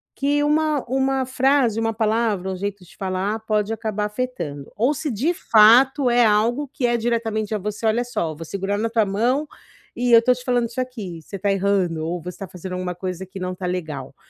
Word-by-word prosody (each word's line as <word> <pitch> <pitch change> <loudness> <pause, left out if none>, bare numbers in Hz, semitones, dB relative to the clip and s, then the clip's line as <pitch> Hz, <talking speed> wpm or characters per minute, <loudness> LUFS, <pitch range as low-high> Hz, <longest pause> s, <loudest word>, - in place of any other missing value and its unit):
que 290 +1 +1
uma 300 -1 +1
uma 265 0 +1
frase, 260 -3 +2
uma 225 0 0
palavra, 215 -3 0
um - - -3
jeito 200 0 -4
de 180 - -18
falar 190 +3 -2
pode 215 -1 0
acabar 215 -2 -2
afetando, 205 - -4
ou 245 +6 +2
se 295 0 -3
de 255 - +1
fato 250 -1 +5
é 240 0 +4
algo 230 +7 +2
que 245 -4 0
é 240 - +2
diretamente 225 -2 -1
a 210 - -2
você: 210 +3 -4
"Olha 225 +2 +2
só, 170 -10 -3
vou 165 - -8
segurar 200 +4 -2
na 230 +1 0
tua 225 -1 +2
mão, 240 +9 0 0.5
e 245 0 0
eu - - +11
estou 250 +2 +3
te 250 - -10
falando 245 -2 +1
isso 245 +2 -3
aqui, 205 -10 -6
você 195 - -9
está 200 +1 0
errando 190 -5 +1
ou 175 +2 -2
você 180 - -6
está 195 - -7
fazendo 185 +1 -8
alguma 180 -1 -3
coisa 185 +1 -5
que 195 0 -9
não 185 0 -3
está 180 0 -5
legal". 155 -7 -4
215 Hz, 215 wpm, -22 LUFS, 190-245 Hz, 0.5 s, eu